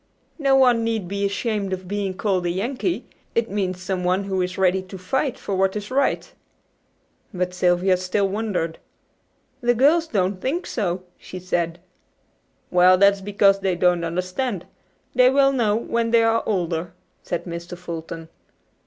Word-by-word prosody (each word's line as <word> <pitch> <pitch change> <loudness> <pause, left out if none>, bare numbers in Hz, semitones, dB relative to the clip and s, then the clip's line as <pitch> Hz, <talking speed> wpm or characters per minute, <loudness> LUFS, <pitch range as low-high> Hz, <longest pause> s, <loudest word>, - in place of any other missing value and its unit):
No 275 -2 +3
one 250 -4 +4
need 225 -5 -1
be 200 +2 -1
ashamed 200 -1 -2
of 185 -1 -5
being 200 -1 -2
called 185 -3 0
a - - +1
'Yankee.' 245 - -2 0.3
It 230 -2 0
means 185 -3 -1
someone 185 +1 0
who 190 -1 -1
is 180 0 -3
ready 190 0 +2
to 185 +1 -10
fight 250 +8 -1
for 200 - -4
what 190 +1 +1
is 210 +2 -5
right." 275 +2 0 1.0
But 180 0 -2
Sylvia 180 +1 +2
still 185 +2 0
wondered. 195 -5 -2 0.8
"The 240 0 +2
girls 310 +7 +4
don't 190 -5 -1
think 325 +8 -1
so," 185 -5 -2 0.2
she 185 - -9
said. 175 -2 -2 0.9
"Well, 180 +1 +6
that 200 +1 +6
is 200 - -9
because 195 0 +3
they 190 -2 0
don't 175 -1 +2
understand. 185 +5 -2 0.5
They 250 0 +6
will 275 +1 +4
know 230 -6 +1
when 230 0 -1
they 230 0 +4
are 225 0 +3
older," 175 -4 -1 0.3
said 175 -1 -4
Mr. 170 0 -6
Fulton. 165 -1 -7
195 Hz, 160 wpm, -23 LUFS, 180-225 Hz, 1.0 s, Well